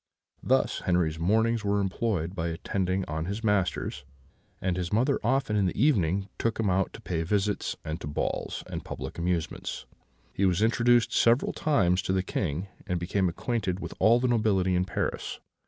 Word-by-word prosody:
Thus -, -, +2 dB
Henri's 85 Hz, -3 st, +1 dB
mornings 110 Hz, +6 st, +2 dB
were 100 Hz, 0 st, +1 dB
employed 95 Hz, -3 st, -1 dB
by 85 Hz, -3 st, -2 dB
attending 95 Hz, +2 st, -1 dB
on 80 Hz, +1 st, -3 dB
his 100 Hz, +5 st, -4 dB
masters; 95 Hz, -8 st, 0 dB, 0.6 s
and 90 Hz, -1 st, -1 dB
his 90 Hz, -1 st, -3 dB
mother 130 Hz, +6 st, +2 dB
often 125 Hz, -2 st, +1 dB
in 100 Hz, -2 st, +3 dB
the 90 Hz, -, -3 dB
evening 100 Hz, -, +2 dB
took 115 Hz, -1 st, -1 dB
him 105 Hz, -4 st, +2 dB
out 95 Hz, +1 st, +1 dB
to -, -, -10 dB
pay 85 Hz, -2 st, -2 dB
visits, 100 Hz, +4 st, 0 dB
and 80 Hz, +2 st, -4 dB
to -, -, -5 dB
balls 75 Hz, -, -2 dB
and -, -, -6 dB
public -, -, -6 dB
amusements. 85 Hz, -2 st, -2 dB, 0.5 s
He 100 Hz, -, -1 dB
was 95 Hz, +1 st, +3 dB
introduced 120 Hz, +1 st, +3 dB
several 120 Hz, +3 st, +3 dB
times 95 Hz, -, +2 dB
to 95 Hz, -, -1 dB
the 95 Hz, -1 st, +1 dB
King, 90 Hz, -1 st, -2 dB, 0.2 s
and 90 Hz, -1 st, -1 dB
became 95 Hz, +2 st, 0 dB
acquainted 95 Hz, 0 st, -2 dB
with 85 Hz, -3 st, -6 dB
all 115 Hz, +2 st, +5 dB
the 125 Hz, -, +1 dB
nobility 105 Hz, -6 st, +2 dB
in 90 Hz, +1 st, +2 dB
Paris. -, -, -3 dB
95 Hz, 175 wpm, -28 LUFS, 90-110 Hz, 0.6 s, all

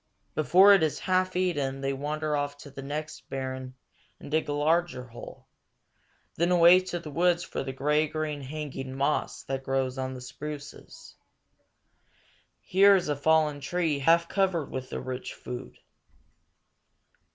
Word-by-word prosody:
Before 185 Hz, +7 st, +6 dB
it 195 Hz, -, +5 dB
is 155 Hz, -2 st, +1 dB
half 185 Hz, 0 st, 0 dB
eaten 145 Hz, -7 st, -1 dB
they 135 Hz, 0 st, -1 dB
wander 150 Hz, +2 st, -2 dB
off 145 Hz, 0 st, -2 dB
to 145 Hz, 0 st, -12 dB
the 135 Hz, -, -8 dB
next 150 Hz, +2 st, -6 dB
barren 130 Hz, -1 st, -5 dB, 0.4 s
and -, -, -10 dB
dig 155 Hz, 0 st, 0 dB
a -, -, 0 dB
larger 155 Hz, -2 st, +1 dB
hole; 120 Hz, -1 st, -11 dB, 0.9 s
then 170 Hz, +2 st, +2 dB
away 175 Hz, +1 st, +7 dB
to 185 Hz, -1 st, -4 dB
the 165 Hz, -3 st, -8 dB
woods 175 Hz, +3 st, +2 dB
for -, -, -4 dB
the 135 Hz, -, -4 dB
gray 150 Hz, +4 st, +1 dB
green 150 Hz, -1 st, -3 dB
hanging 135 Hz, -2 st, -6 dB
moss 140 Hz, +2 st, -1 dB
that 135 Hz, 0 st, -3 dB
grows 135 Hz, 0 st, -1 dB
on 130 Hz, 0 st, -3 dB
the 125 Hz, -, -8 dB
spruces. 145 Hz, +3 st, -9 dB, 1.5 s
Here 195 Hz, +2 st, +5 dB
is 180 Hz, -5 st, 0 dB
a 145 Hz, -, +1 dB
fallen 150 Hz, 0 st, +2 dB
tree 160 Hz, -1 st, -1 dB
half 170 Hz, +4 st, +4 dB
covered 185 Hz, -6 st, 0 dB
with 130 Hz, -1 st, -5 dB
the -, -, -4 dB
rich 130 Hz, -1 st, -6 dB
food. 125 Hz, +1 st, -8 dB
150 Hz, 150 wpm, -28 LUFS, 135-170 Hz, 1.5 s, away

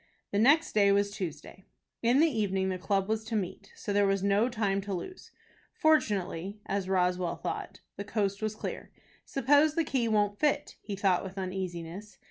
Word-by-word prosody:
The 200 Hz, -, +1 dB
next 285 Hz, +8 st, +4 dB
day 200 Hz, -2 st, +5 dB
was 200 Hz, 0 st, +2 dB
Tuesday. 185 Hz, -2 st, -7 dB, 0.4 s
In 240 Hz, +3 st, +3 dB
the -, -, +6 dB
evening 195 Hz, -8 st, 0 dB
the 185 Hz, -1 st, -3 dB
club 195 Hz, 0 st, 0 dB
was 220 Hz, 0 st, -1 dB
to 225 Hz, 0 st, -3 dB
meet, 200 Hz, 0 st, -4 dB
so 205 Hz, -, -4 dB
there 205 Hz, 0 st, +4 dB
was 195 Hz, -1 st, +1 dB
no 200 Hz, +4 st, +3 dB
time 205 Hz, -4 st, 0 dB
to 195 Hz, -1 st, -4 dB
lose. 370 Hz, -, -8 dB, 0.5 s
Fortunately, 205 Hz, -, +1 dB
as 195 Hz, -1 st, -2 dB
Roswell 180 Hz, -2 st, +1 dB
thought, -, -, -5 dB, 0.2 s
the 200 Hz, -, -4 dB
coast 200 Hz, -1 st, -1 dB
was 215 Hz, 0 st, -2 dB
clear. -, -, -6 dB, 0.4 s
"Suppose 290 Hz, +3 st, +3 dB
the 330 Hz, -, +2 dB
key 260 Hz, -6 st, 0 dB
won't 205 Hz, -2 st, +1 dB
fit?" 300 Hz, -2 st, +1 dB
he 205 Hz, -, -5 dB
thought 190 Hz, -2 st, +2 dB
with 190 Hz, 0 st, -8 dB
uneasiness. 185 Hz, +1 st, -5 dB
200 Hz, 180 wpm, -30 LUFS, 190-220 Hz, 0.5 s, the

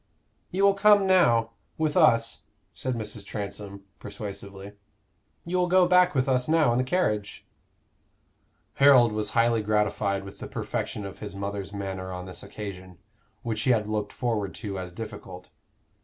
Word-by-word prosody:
"You 190 Hz, +2 st, -1 dB
will 200 Hz, 0 st, +6 dB
come 205 Hz, 0 st, +5 dB
now 120 Hz, -12 st, +4 dB, 0.3 s
with 155 Hz, -2 st, 0 dB
us," 115 Hz, 0 st, +3 dB, 0.3 s
said 130 Hz, -1 st, -3 dB
Mrs. 105 Hz, -2 st, -5 dB
Transome, 100 Hz, -1 st, -6 dB, 0.2 s
persuasively. 100 Hz, -1 st, -8 dB, 0.7 s
"You 175 Hz, +2 st, -1 dB
will 180 Hz, 0 st, +2 dB
go 180 Hz, 0 st, +4 dB
back 180 Hz, -2 st, +4 dB
with 130 Hz, 0 st, +1 dB
us 125 Hz, -1 st, +1 dB
now 155 Hz, -4 st, +3 dB
in 120 Hz, -, +1 dB
the -, -, +2 dB
carriage." 105 Hz, -, -1 dB, 1.3 s
Harold 135 Hz, -5 st, +6 dB
was 105 Hz, -1 st, -2 dB
highly 115 Hz, -1 st, +3 dB
gratified 105 Hz, -2 st, 0 dB
with 100 Hz, 0 st, -11 dB
the -, -, -6 dB
perfection 105 Hz, -, -4 dB
of 100 Hz, -, -9 dB
his 100 Hz, -2 st, -7 dB
mother's 100 Hz, 0 st, -5 dB
manner 95 Hz, -2 st, -5 dB
on 90 Hz, 0 st, -6 dB
this 90 Hz, -, -8 dB
occasion, 95 Hz, -4 st, -8 dB, 0.5 s
which 110 Hz, -2 st, -2 dB
he 130 Hz, -, 0 dB
had 110 Hz, -4 st, +2 dB
looked 105 Hz, -1 st, -2 dB
forward 110 Hz, -6 st, -2 dB
to 100 Hz, -4 st, -5 dB
as 90 Hz, -1 st, -6 dB
difficult. 90 Hz, -2 st, -9 dB
105 Hz, 155 wpm, -26 LUFS, 100-130 Hz, 1.3 s, will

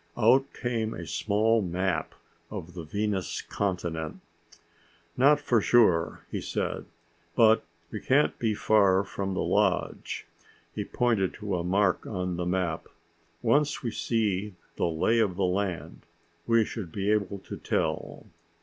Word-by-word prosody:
Out 125 Hz, +4 st, +4 dB
came 115 Hz, -2 st, -2 dB
a -, -, -6 dB
small 110 Hz, +2 st, +2 dB
map 90 Hz, -2 st, -1 dB, 0.3 s
of 85 Hz, +2 st, -7 dB
the 85 Hz, -, -6 dB
Venus 100 Hz, +3 st, -2 dB
continent. 85 Hz, -5 st, -3 dB, 1.0 s
"Not 145 Hz, +3 st, +5 dB
for 120 Hz, -6 st, +2 dB
sure," 95 Hz, -10 st, +3 dB
he -, -, -3 dB
said. -, -, -3 dB, 0.5 s
"But 110 Hz, 0 st, +5 dB, 0.3 s
we 110 Hz, -, -4 dB
can't 145 Hz, +3 st, +3 dB
be 110 Hz, -3 st, +1 dB
far 100 Hz, -3 st, +4 dB
from 95 Hz, -1 st, -4 dB
the -, -, 0 dB
lodge." -, -, 0 dB, 0.5 s
He -, -, -3 dB
pointed 115 Hz, -6 st, 0 dB
to 105 Hz, -3 st, -3 dB
a 85 Hz, -, -1 dB
mark 95 Hz, +1 st, +1 dB
on 90 Hz, -3 st, -2 dB
the 90 Hz, 0 st, -2 dB
map. 90 Hz, -3 st, -1 dB, 0.6 s
"Once 145 Hz, 0 st, +2 dB
we 120 Hz, -, -1 dB
see 105 Hz, -4 st, -1 dB, 0.2 s
the -, -, 0 dB
lay 85 Hz, +8 st, +2 dB
of 100 Hz, -5 st, +1 dB
the 95 Hz, 0 st, +1 dB
land, 90 Hz, -1 st, -2 dB, 0.5 s
we 115 Hz, -1 st, +4 dB
should 100 Hz, -8 st, -6 dB
be 100 Hz, +3 st, 0 dB
able 100 Hz, -2 st, 0 dB
to 95 Hz, -, -8 dB
tell." -, -, -2 dB
100 Hz, 140 wpm, -28 LUFS, 90-115 Hz, 1.0 s, Not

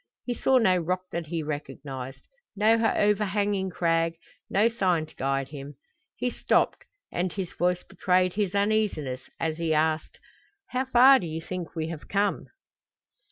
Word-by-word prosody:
He 245 Hz, -, -1 dB
saw 260 Hz, +2 st, +3 dB
no 190 Hz, -7 st, +4 dB
rock 180 Hz, +2 st, -1 dB
that 170 Hz, -1 st, -4 dB
he 165 Hz, 0 st, -2 dB
recognized, 135 Hz, -3 st, -6 dB, 0.3 s
no 215 Hz, +2 st, +4 dB
overhanging 205 Hz, -3 st, +1 dB
crag, 165 Hz, -1 st, +1 dB, 0.3 s
no 205 Hz, +4 st, +4 dB
sign 185 Hz, -8 st, +1 dB
to -, -, -20 dB
guide 135 Hz, 0 st, -1 dB
him. 145 Hz, -1 st, -8 dB, 0.4 s
He 250 Hz, -, -1 dB
stopped, -, -, +1 dB, 0.3 s
and 180 Hz, +1 st, -1 dB
his 190 Hz, -2 st, -5 dB
voice 180 Hz, 0 st, 0 dB
betrayed 185 Hz, -1 st, +1 dB
his 205 Hz, -2 st, -1 dB
uneasiness 200 Hz, -11 st, 0 dB
as 160 Hz, -1 st, -1 dB
he 160 Hz, -2 st, +1 dB
asked: 155 Hz, 0 st, 0 dB, 0.5 s
"How 255 Hz, +1 st, 0 dB
far 260 Hz, +1 st, +7 dB
do 175 Hz, -, -5 dB
you 160 Hz, 0 st, -4 dB
think 175 Hz, +1 st, -6 dB
we 160 Hz, -1 st, -2 dB
have 165 Hz, -3 st, -7 dB
come?" 200 Hz, 0 st, 0 dB
180 Hz, 155 wpm, -27 LUFS, 155-205 Hz, 0.5 s, far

